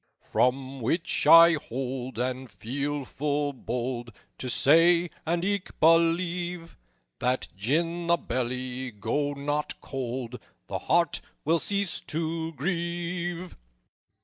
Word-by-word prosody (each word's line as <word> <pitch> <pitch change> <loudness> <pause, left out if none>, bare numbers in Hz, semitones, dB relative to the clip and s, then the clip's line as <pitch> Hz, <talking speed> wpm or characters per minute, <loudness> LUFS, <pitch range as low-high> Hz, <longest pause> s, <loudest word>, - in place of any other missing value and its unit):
"From 130 +1 0
which 165 +9 0
I 165 0 +9
hold, 130 -3 -4
and 130 +1 -2
feel 140 +9 -3
full 145 +1 -1
bold 120 -1 -4 0.3
To 130 - -4
say, 170 +6 +4 0.2
and 170 +2 +1
eke 200 -1 -2
believe, 170 +1 +2 0.4
That 125 +1 0
gin 165 - 0
the 170 0 +4
belly 125 0 -3
go 120 +7 -1
not 145 +1 -2
cold 125 -2 -5 0.3
The - - -4
heart 170 +1 +2 0.2
will 165 +2 +3
cease 200 -3 0
to 160 +1 -2
grieve_." 175 +2 -2
145 Hz, 110 wpm, -27 LUFS, 130-170 Hz, 0.4 s, I